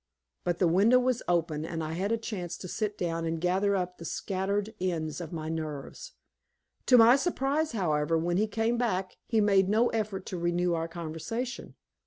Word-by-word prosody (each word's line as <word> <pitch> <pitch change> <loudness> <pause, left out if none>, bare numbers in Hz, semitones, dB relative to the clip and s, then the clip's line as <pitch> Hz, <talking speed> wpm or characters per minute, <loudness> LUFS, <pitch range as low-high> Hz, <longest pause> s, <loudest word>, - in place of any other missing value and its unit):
But 175 -1 0
the 180 - +3
window 200 +9 +5
was 250 -1 +1
open, 165 -3 0
and 165 0 -4
I 155 - -4
had 190 +5 -1
a 230 - +2
chance 190 -6 -5
to 185 - -8
sit 210 +3 -3
down 165 -2 -2
and 165 0 -2
gather 190 +4 +1
up 180 -1 -3
the - - -8
scattered 200 +5 -2
ends 165 -3 -2
of 165 - -7
my 160 -2 -4
nerves. 160 - -5 0.7
To 250 - +7
my 235 +2 +8
surprise, 290 -1 0
however, 165 -5 +1
when 175 +2 0
he 215 +2 +2
came 225 +3 0
back 190 -6 -1
he 225 - +2
made 195 -2 +4
no 225 +4 +3
effort 210 -4 -2
to 180 - -5
renew 175 +1 +1
our 165 0 -1
conversation. 170 +9 -5
185 Hz, 190 wpm, -29 LUFS, 165-220 Hz, 0.7 s, my